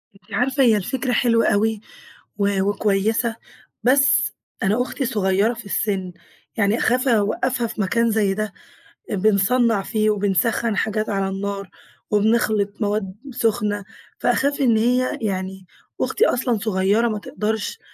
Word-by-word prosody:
أنتِ 195 - -17
عارفة، 265 +2 +2
هي 225 -4 +5
الفكرة 250 +6 -2
حلوة 230 -2 +3
أوي، 215 +1 +1 0.6
و 200 -1 +1
وكويسة، 205 +3 0 0.5
بس 260 +1 +3 0.3
أنا 210 +5 +2
أختي 260 +2 -3
صغيّرة 205 -1 +1
في 235 -2 -10
السِّن، 195 -3 -2 0.4
يعني 205 +1 +2
أخاف 255 +2 +1
أوقّفها 235 +2 +1
في 215 - -4
مكان 230 +4 +1
زي 210 -3 +1
ده. 215 0 -3 0.6
آآ، - - 0
بنصنّع 215 +3 +2
فيه 215 +2 0
وبنسخّن 210 +2 +1
حاجات 215 0 -1
على 195 -1 -1
النار، 200 0 -4 0.4
وبنخلِط 210 -1 +1
مواد 205 -2 -1 0.2
سُخنة، 210 -4 -1 0.3
فأخاف 285 +1 +1
إن 235 -4 +4
هي 250 +3 +1
يعني، 190 -2 -3 0.4
أختي 460 - +2
أصلًا 245 - +1
صغيّرة 205 +2 +1
ما 215 -2 -2
تقدَرش. 215 - -3
215 Hz, 135 wpm, -21 LUFS, 200-235 Hz, 0.6 s, هي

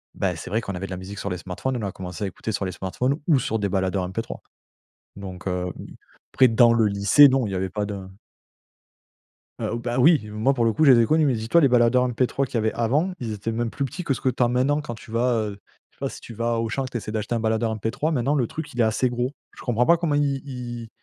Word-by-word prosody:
beh, - - -1
c'est - - -8
vrai 110 +4 0
qu'on 100 - -5
avait 95 +2 -5
de - - -11
la 95 - -4
musique 95 +2 -8
sur 100 - -3
les 90 - -3
smartphones. 110 +9 -4
On 100 - -2
a - - -4
commencé 90 +2 -6
à - - -1
écouter 105 +4 -5
sur 100 -2 -2
les 95 - -3
smartphones 125 - -2
ou 145 -6 +4
sur 110 -1 -1
des 100 -1 -1
baladeurs 95 0 0
MP3, 115 +4 -5 0.8
donc 95 -1 -8
heu, 90 -1 -2
oui. - - -10 0.4
Après, 130 0 +6
dans 115 +1 +5
le 115 -2 +3
lycée, 100 +8 +6
non, 130 -4 +1
il - - -5
y - - -1
avait 95 0 -1
pas 105 +1 -2
de 100 -2 -6 1.5
Heu, 115 - -2
bah 120 +1 -3
oui! 155 +4 +6
Moi, 110 +6 +1
pour 120 -3 +1
le 115 - +2
coup, 155 +9 +2
je 135 - +8
les 120 - +6
ai 115 - +4
connus. 155 +2 +3
Mais 135 - +2
dis 110 0 -4
toi, 170 - +5
les 140 - +6
baladeurs 125 0 +4
MP3 125 +2 0
qu'il 125 - -9
y - - +3
avait 110 -1 0
avant, 145 +11 +1
ils 115 -3 -4
étaient 105 +2 -4
même 115 +1 -1
plus 140 +3 -3
petits 180 +7 -6
que 140 - 0
ce - - -6
que 130 - +2
tu 125 0 -3
as 120 - +4
maintenant 130 +5 +1
quand 120 -5 -6
tu 110 - -14
vas, 120 +2 +1 0.2
heu, 100 - -9 0.3
je - - -33
sais - - -33
pas - - -2
si - - -10
tu 115 - -10
vas 115 +2 -1
à - - 0
Auchan, 115 +4 -1
que 130 - -6
tu 120 - -2
essaies 105 -1 -6
d'acheter 110 +2 -2
un 115 - 0
baladeur 110 0 0
MP3. 115 +9 -2
Maintenant, 140 +1 +1
le 125 -6 +1
truc, 160 - -7
il 120 - -7
est 115 - +5
assez 110 +3 +1
gros. 125 +1 -2 0.2
Je - - -12
comprends 120 0 +1
pas 170 +4 +5
comment 160 -3 0
i 140 -2 +1
ils 120 -4 -6
115 Hz, 290 wpm, -24 LUFS, 105-130 Hz, 1.5 s, je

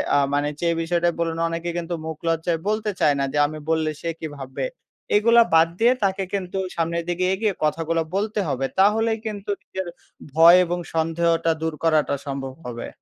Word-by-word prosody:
আ - - +5 0.2
মানে 145 +1 +1
যে 170 - +2
বিষয়টা 170 +1 +1
বলুন, 165 -1 -1
অনেকে 165 +1 -3
কিন্তু 175 0 -3
মুখ 160 -1 -5
লজ্জায় 165 0 0
বলতে 215 0 0
চায় 145 -1 +4
না 140 - +1
যে, - - -1
"আমি 155 +1 -7
বললে 160 -1 +1
সে 170 - -2
কী 160 - -4
ভাববে?" 135 -1 -4 0.5
এগুলা 235 +3 +6
বাদ 165 0 +6
দিয়ে 235 +2 +5
তাকে 195 0 +1
কিন্তু 195 -1 -3 0.2
সামনের 170 0 -1
দিকে 175 +1 0
এগিয়ে 210 +1 0
কথাগুলা 165 +2 0
বলতে 210 +2 -1
হবে। 135 0 -1
তাহলেই 220 +3 +3
কিন্তু 205 -2 -5
নিজের 190 -1 -5 0.5
ভয় 165 +3 +8
এবং 175 +1 -2 0.2
সন্দেহটা 165 +1 +1
দূর 160 0 -1
করাটা 155 -3 +2
সম্ভব 135 -1 -4
হবে। 120 -1 -5
165 Hz, 180 wpm, -23 LUFS, 160-190 Hz, 0.5 s, ভয়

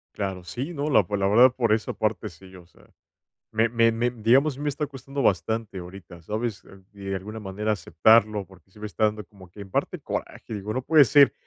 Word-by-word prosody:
Claro, 95 -3 -4
sí, 130 - -5
no, 145 -1 -2
la 110 -9 +4
pues, 100 +3 -3
la 95 - +2
verdad, 120 +6 +6
por 115 -4 +1
esa 110 0 -1
parte 105 -1 -2
sí, 95 +2 -16
o 90 -2 -14
sea, 85 - -24 0.6
me 110 +1 +2
me 115 0 +3
me, 120 +2 0
digamos, 125 +6 +2
a - - -13
mí 145 - -5
me - - 0
está 145 +1 -2
costando 135 0 -6
bastante 105 +1 0
ahorita, 90 -1 -11
¿sabes? 110 +3 -4
Eh, 95 0 -16
de 100 -1 -5
alguna 105 +4 -6
manera 105 +1 -4
aceptarlo, 105 0 +3
porque 95 -1 -21
se 105 - -17
me 105 - -4
está 105 +1 -1
dando 105 0 0
como 95 -1 -17
que 95 +4 -14
en 100 -1 -10
parte - - -2
coraje, - - -6
digo: 105 +1 -4
"No 130 - -2
puede 150 +2 +6
ser". 140 +2 +5
105 Hz, 230 wpm, -25 LUFS, 95-120 Hz, 0.6 s, verdad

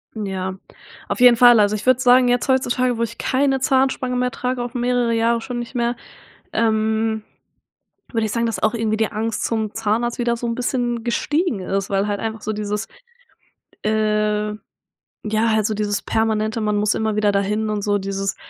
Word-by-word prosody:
Ja, 190 -3 -4 0.5
auf - - -3
jeden 245 -1 +7
Fall. 240 -1 +7
Also, 205 0 +3
ich 210 - -6
würde 255 -1 +5
sagen 250 0 +5
jetzt 245 0 +1
heutzutage, 255 -2 +1
wo - - +1
ich 230 0 -5
keine 270 0 +1
Zahnspange 260 -1 +1
mehr 250 0 +1
trage, 250 0 -3
auch 240 0 -5
mehrere 245 -1 +1
Jahre 230 +1 +1
schon 245 +1 -5
nicht 240 +1 -7
mehr 240 0 0 0.6
ähm, 220 0 +1 0.9
würde 225 -2 0
ich 210 - -4
sagen, 235 0 0
dass 225 - -3
auch 215 - +3
irgendwie 220 -2 0
die 220 0 -1
Angst 220 +1 -2
zum 220 -2 -2
Zahnarzt 225 +2 -1
wieder 235 -1 0
so 235 - -4
'n 230 - -1
bisschen 240 -1 -2
gestiegen 290 - 0
ist, 195 +2 -2
weil 195 0 +1
halt 205 -1 -2
einfach 225 0 -4
so 215 - -2
dieses, 210 0 -3 1.0
äh 210 0 0 0.7
ja 215 +2 +1
halt 215 -1 +2
so 215 - 0
dieses 205 -1 -1
permanente 220 0 0
man 210 -1 0
muss 210 +1 +2
immer 220 -1 -1
wieder 210 -1 +2
dahin 210 +2 0
und 210 -1 -2
so 205 0 +1
dieses 195 0 -3
225 Hz, 190 wpm, -21 LUFS, 210-240 Hz, 1.0 s, jeden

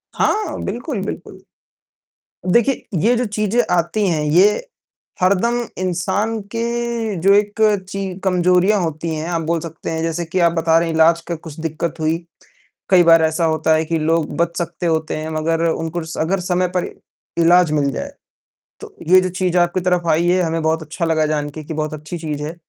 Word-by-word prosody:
हाँ, 420 -7 0
बिल्कुल, 240 - -4
बिल्कुल। - - -7 1.1
देखिए, 240 +6 +2
ये 230 +8 +3
जो 245 +1 0
चीज़ें 215 +2 0
आती 175 +5 0
हैं, 160 -4 0
ये 185 - +3 0.6
हरदम 200 +6 +2 0.3
इंसान 190 +5 -1 0.2
के 235 -2 -2
जो 195 +3 +5
एक 210 +2 +1 0.3
ची 195 0 -4 0.2
कमजोरियाँ 180 +2 +3
होती 165 0 -3
हैं, 155 +1 -4
आप 170 -2 -1
बोल 165 +1 -1
सकते 165 0 -7
हैं 160 0 -2
जैसे 165 +1 -2
कि 175 +3 -2
आप 170 -1 +4
बता 165 -1 +2
रहे 170 - -1
हैं 160 - -2
इलाज 165 +1 +4
का 170 - -2
कुछ 160 -1 -11
दिक़्क़त 160 +1 -3
हुई। 160 +1 +1 0.7
कई 185 -2 +6
बार 165 -1 +6
ऐसा 160 +2 +1
होता 160 0 +2
है 160 0 0
कि 165 +1 -1
लोग 160 0 0
बच 170 0 0
सकते 170 0 -4
होते 160 -1 -1
हैं 155 +1 -4
मगर 165 +1 0
उनको 165 +1 -3 0.2
अगर 185 +5 0
समय 180 0 0
पर 180 - 0 0.5
इलाज 170 0 +5
मिल 145 -2 +1
जाए। - - -5 0.7
तो - - -11
ये 185 +2 +7
जो 185 - -1
चीज़ 185 0 -1
आपकी 175 +1 +2
तरफ़ 180 -1 0
आई 165 +3 +2
है 180 +1 +3
हमें 165 0 -1
बहुत 160 +1 +1
अच्छा 165 +3 -4
लगा 160 -1 +1
जान 150 -1 -1
के 155 +2 -9
कि 160 +2 -6
बहुत 155 0 -3
अच्छी 155 +3 -6
चीज़ 150 -3 -4
है। 155 +3 -5
170 Hz, 190 wpm, -19 LUFS, 160-185 Hz, 1.1 s, ये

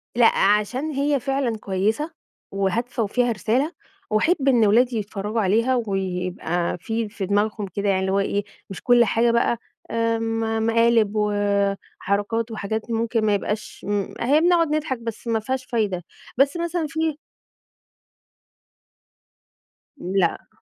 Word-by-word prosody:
لأ، 235 -1 +5
عشان 210 +9 +2
هي 285 0 +1
فعلًا 270 -4 -1
كويسة 210 - -1 0.4
وهادفة 220 +5 -1
وفيها 240 +3 +1
رسالة، 240 - 0 0.4
وأحب 275 +7 +2
إن 245 -4 +5
أولادي 235 +3 +3
يتفرجوا 210 +1 -2
عليها 225 +6 +2
ويبقى 180 -2 -2
في 225 +4 -3
في 205 -2 -4
دماغهم 205 +1 0
كده، 200 0 -1
يعني 190 -1 +2
اللي 190 0 0
هو 195 - +2
إيه، 200 +1 0 0.3
مش 195 - -7
كل 240 -1 +5
حاجة 230 +2 +2
بقى، 235 0 +2 0.3
آمم، 225 -1 0
مقالب 230 -2 +3
وحركات 205 +2 -1
وحاجات 220 +2 -4
ممكن 225 0 0
ما 210 - +3
يبقاش 210 +1 -3
م 205 -1 -1
هي 285 +6 +3
بنقعد 340 -1 +4
نضحك 300 -4 -1
بس 230 0 -7
ما 225 -1 +1
فيهاش 255 +3 -3
فايدة، 210 -8 -1 0.3
بس 275 +4 +3
مثلًا 340 -1 -1
في 320 0 -1 2.8
لأ. 185 -6 -1
225 Hz, 130 wpm, -23 LUFS, 200-245 Hz, 2.8 s, لأ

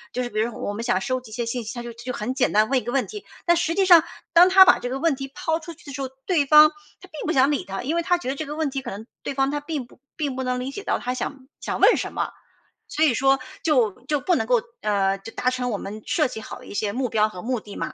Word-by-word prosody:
就 250 - 0
是 240 - -4
比 215 -2 -3
如 225 - +1
说 - - -10
我 205 - -3
们 210 - -5
想 240 -5 +1
收 255 +5 -1
集 225 - -14
一 - - -9
些 240 +1 -2
信 235 +1 -3
息， 220 - -5
他 240 -1 -6
就 240 - -7
就 240 +2 -6
很 235 +4 -3
简 260 - +1
单 215 +2 +4
问 270 - +3
一 - - -9
个 240 - -4
问 270 -2 +1
题。 420 -2 -9 0.2
但 345 -1 +4
实 335 -1 0
际 390 0 +3
上， 345 -4 +8 0.3
当 345 +2 +8
他 380 0 +9
把 365 - +5
这 245 - -4
个 260 - -2
问 330 -1 +2
题 270 0 -6
抛 320 +1 -1
出 335 +1 -9
去 - - -21
的 280 - -8
时 275 - -5
候， 265 - -3 0.2
对 330 -6 +2
方 300 +2 +8 0.3
他 375 - -14
并 305 -2 -6
不 330 - +1
想 270 +1 +4
理 290 - -1
他。 195 0 -5
因 295 +6 -1
为 - - +2
他 355 +1 +2
觉 345 - -5
得 270 - -1
这 310 - -4
个 295 +1 -6
问 310 -2 -1
题 270 0 -4
可 250 - -6
能 210 +3 -8 0.2
对 - - -3
方 270 0 +1
他 295 - -1
并 290 -3 -4
不 240 - -21 0.2
并 285 -5 -2
不 260 - -2
能 250 0 -1
理 260 +2 -4
解 400 +8 -7
到 - - 0
他 250 +1 -3
想 265 0 -5
想 - - -4
问 - - +6
什 - - -4
么。 - - -2 0.6
所 310 - 0
以 265 - +3
说 270 +2 +3 0.2
就 250 -10 +3 0.2
就 295 -1 +1
不 355 +5 +2
能 225 - 0
够， 245 -2 +3 0.2
呃 195 -2 +1
就 225 - -10
达 255 - +1
成 250 -1 -2
我 205 - -1
们 210 +3 -7
设 305 -5 +1
计 220 - -7
好 - - -9
的 - - -14
一 - - -9
些 205 0 -1
目 255 0 -1
标 215 0 +2
和 180 -4 -9
目 250 +1 -2
的 205 -1 -11
嘛。 - - -4
260 Hz, 350 characters per minute, -23 LUFS, 235-305 Hz, 0.6 s, 他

